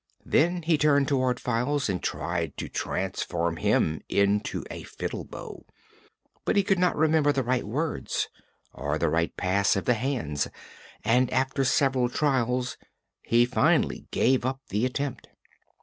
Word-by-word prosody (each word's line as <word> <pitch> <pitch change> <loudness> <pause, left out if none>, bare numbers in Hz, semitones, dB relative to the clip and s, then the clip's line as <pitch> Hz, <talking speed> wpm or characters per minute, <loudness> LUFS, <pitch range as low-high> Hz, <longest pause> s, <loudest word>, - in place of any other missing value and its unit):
Then 175 +2 +2
he 160 -2 +2
turned 145 -2 +4
toward 130 -3 +1
Files 125 +4 0
and 95 -4 -2
tried 85 -3 -3
to - - -4
transform 85 0 -2
him 80 -1 +1
into 100 +1 +1
a - - -6
fiddle - - -5
bow. - - -9 0.8
But - - 0
he 200 - +4
could 195 -1 +1
not 180 0 +2
remember 155 -1 +3
the 135 -2 0
right 125 +1 0
words 150 +8 -2 0.5
or 75 +2 -2
the 85 - +1
right 85 +1 0
pass 100 +2 +2
of 95 - -2
the 125 - +4
hands 115 - -1 0.6
and 125 +3 +3
after 130 +1 +1
several 135 -2 +2
trials 125 -2 0 0.4
he 120 +1 +3
finally 125 - +1
gave 130 0 +2
up 130 +1 -2
the 105 +6 +1
attempt. 140 +1 -4
125 Hz, 150 wpm, -27 LUFS, 100-145 Hz, 0.8 s, turned